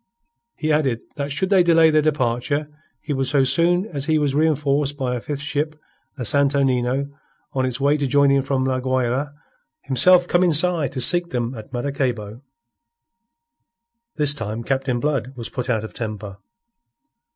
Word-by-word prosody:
He 155 -1 -2
added 135 -6 0
that 140 0 -4
should 185 +7 -2
they 190 -2 +5
delay 165 -2 +5
their 155 0 +3
departure, 145 0 -1 0.3
he 150 - -4
would 135 -1 -1
so 140 0 +2
soon 170 +7 +2
as 145 -9 -5
he 155 0 +2
was 145 -3 0
reenforced 145 -1 +1
by 130 -3 -2
a 120 - -5
fifth 145 +1 -5
ship, 150 +1 -2 0.4
the 125 - -4
Santo 140 +3 +3
Nino, 130 +1 0 0.4
on 130 -1 0
its 125 +1 -3
way 140 +2 +2
to 145 -2 -1
join 140 +1 +3
him 140 0 +3
from 135 -1 -1
La 130 -1 0
Guayra, 130 +2 -1 0.5
himself 175 +7 +4
come 175 +1 +2
inside 165 -4 +2
to 130 - -3
seek 175 +6 +3
them 120 0 -3
at 110 -2 -10
Maracaybo. 120 -4 -3 1.7
This 145 -2 +2
time 115 -3 -5
Captain 130 -1 -1
Blood 135 -1 -2
was 115 -2 -6
put 125 -1 -5
out 110 -3 0
of 110 - -8
temper. 105 -3 -6
140 Hz, 170 wpm, -21 LUFS, 125-150 Hz, 1.7 s, they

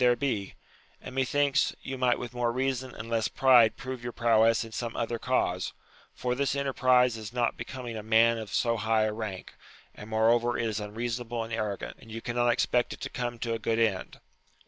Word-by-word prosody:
there 125 -1 +5
be; 115 -8 -2 0.4
and, 130 - -9
methinks, 140 +2 +1
you 135 - -4
might 125 -1 +2
with 120 -1 -7
more 120 -1 0
reason 130 0 -2
and 110 - -7
less 115 -1 0
pride 125 -4 +5
prove 130 -2 -6
your 120 - -4
prowess 115 -1 +3
in 115 - -10
some 115 +1 -4
other 115 0 -2
cause, 95 -9 0 0.4
for 125 0 -1
this 140 +1 0
enterprize 130 -3 +3
is 110 -1 -7
not 120 -1 0
becoming 120 0 -6
a 110 - -4
man 115 +2 +4
of 110 -3 -7
so 115 +1 +1
high 110 0 +2
a 110 0 0
rank, 105 -4 -6 0.4
and 105 - -11
moreover 115 +2 +2
it 115 - -1
is 110 -1 -2
unreasonable 115 +2 -3
and 115 0 -7
arrogant, 105 -3 -3
and 115 - -13
you 115 - -5
cannot 120 +1 0
expect 120 0 +1
it - - -10
to - - -5
come 120 -1 -3
to 115 0 -2
a 115 - -2
good 110 +1 0
end. 110 -5 0
120 Hz, 205 wpm, -28 LUFS, 110-125 Hz, 0.4 s, there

